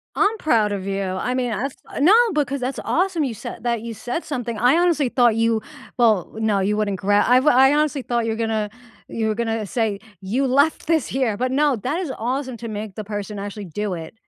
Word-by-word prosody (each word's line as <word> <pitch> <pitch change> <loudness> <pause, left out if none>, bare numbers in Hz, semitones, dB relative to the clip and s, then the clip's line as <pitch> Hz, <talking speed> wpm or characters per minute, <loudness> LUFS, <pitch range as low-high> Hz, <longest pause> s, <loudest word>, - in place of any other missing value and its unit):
I'm 425 +2 +2
proud 220 -8 +2
of 190 -1 -4
you. 195 0 -2
I 190 +6 -2
mean, 250 -2 -1
as 275 +4 -3
a - - -5
No, 355 +8 +6 0.2
because 280 -2 0
that's 255 +2 -3
awesome 355 -2 +1
you 255 - -2
said 220 - -8
that 235 -2 0
you 230 0 -6
said 245 +9 -4
something, 245 -6 -4
I 245 +6 +4
honestly 340 -5 +2
thought 240 -3 +3
you 230 -1 +2 0.4
well, 220 -7 +2
no, 215 -3 +1
you 200 +2 +1
wouldn't 205 -2 -1
gra 205 +2 +3
I've 255 +4 +4
I 265 -1 +6
honestly 300 -2 +1
thought 240 -2 -1
you 225 - 0
were - - -2
gonna 220 -2 -1 0.4
you 220 -1 -2
were 215 - 0
gonna 225 -1 -2
say, 215 -2 -1 0.2
"You 245 +9 0
left 285 +4 +2
this 320 -4 +2
here!" 250 -6 -1
but 255 +1 -1
no, 285 0 +3
that 270 - -2
is 330 -8 -3
awesome 255 +1 -3
to 230 - -7
make 210 -2 -6
the 215 - -5
person 205 0 -5
actually 205 0 -6
do 205 +3 -3
it, 165 -2 -7
235 Hz, 225 wpm, -22 LUFS, 210-270 Hz, 0.4 s, No